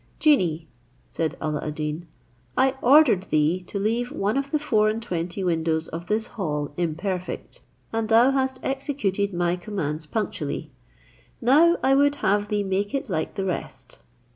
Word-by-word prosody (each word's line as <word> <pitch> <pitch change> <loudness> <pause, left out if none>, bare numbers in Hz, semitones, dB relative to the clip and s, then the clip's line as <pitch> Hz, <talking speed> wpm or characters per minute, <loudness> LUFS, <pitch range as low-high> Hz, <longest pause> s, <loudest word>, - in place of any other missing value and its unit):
"Genie," 170 - +2 0.4
said 165 0 -2
Alla 155 -1 -2
ad 150 -1 -4
Deen, 155 +2 -4 0.5
"I 265 0 +4
ordered 255 -8 +5
thee 155 +4 +2
to - - -4
leave 230 +5 0
one 205 +2 -1
of 275 0 -1
the 305 - +1
four 215 -8 +2
and 220 +1 -1
twenty 180 -3 -4
windows 160 -2 0
of 170 +2 -7
this 220 +1 0
hall 150 -11 -3
imperfect, 180 +3 -3 0.3
and 225 -1 -1
thus 235 +4 +5
hast 265 -1 0
executed 265 -8 -1
my 175 -1 0
commands 165 -6 -4
punctually; 155 -7 -3 0.7
now 310 +8 +5
I 265 - +4
would 285 +1 +4
have 205 -5 +1
thee 205 -1 0
make 200 +4 -1
it 270 -5 -3
like 160 -2 -2
the 195 - -2
rest." 185 - -5
200 Hz, 160 wpm, -24 LUFS, 165-245 Hz, 0.7 s, ordered